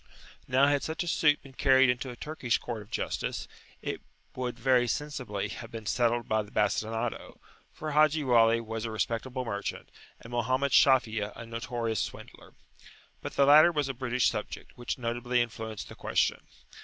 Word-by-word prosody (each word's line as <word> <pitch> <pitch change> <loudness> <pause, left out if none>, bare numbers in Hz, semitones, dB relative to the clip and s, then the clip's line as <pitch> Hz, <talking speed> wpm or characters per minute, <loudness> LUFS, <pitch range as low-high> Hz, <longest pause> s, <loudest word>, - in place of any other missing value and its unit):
[p.48]Now 130 +2 +5
had 145 -1 +2
such 160 +2 -3
a - - -7
suit 150 -3 +3
been 135 -1 -14
carried 135 0 +5
into 125 +1 -1
a 125 - -7
Turkish 130 -3 -1
court 115 -3 -6
of 105 - -14
justice, - - -3 0.4
it - - -4 0.3
would 125 -1 -4
very 125 -2 +3
sensibly 120 -8 -3
have 115 - -8
been 115 -1 -8
settled 120 +1 +1
by 110 0 +1
the 105 - -10
bastinado, 110 +3 -1 0.3
for 155 0 -6
Haji 155 +1 +4
Wali 115 -3 +4
was 115 -1 -5
a 115 - -3
respectable 115 +4 -2
merchant, 100 -3 -4 0.3
and 115 - -12
Mohammed 130 +4 0
Shafi'a 115 -6 +4
a 115 - -8
notorious 115 -1 -3
swindler. - - -7 0.7
But - - -6
the 140 - +5
latter 155 +4 +8
was 150 -4 -1
a - - -2
British 125 -1 +1
subject, - - -6
which 120 - -4
notably 120 0 -1
influenced 110 -2 -4
the - - -10
question. - - 0
120 Hz, 170 wpm, -29 LUFS, 115-135 Hz, 0.7 s, latter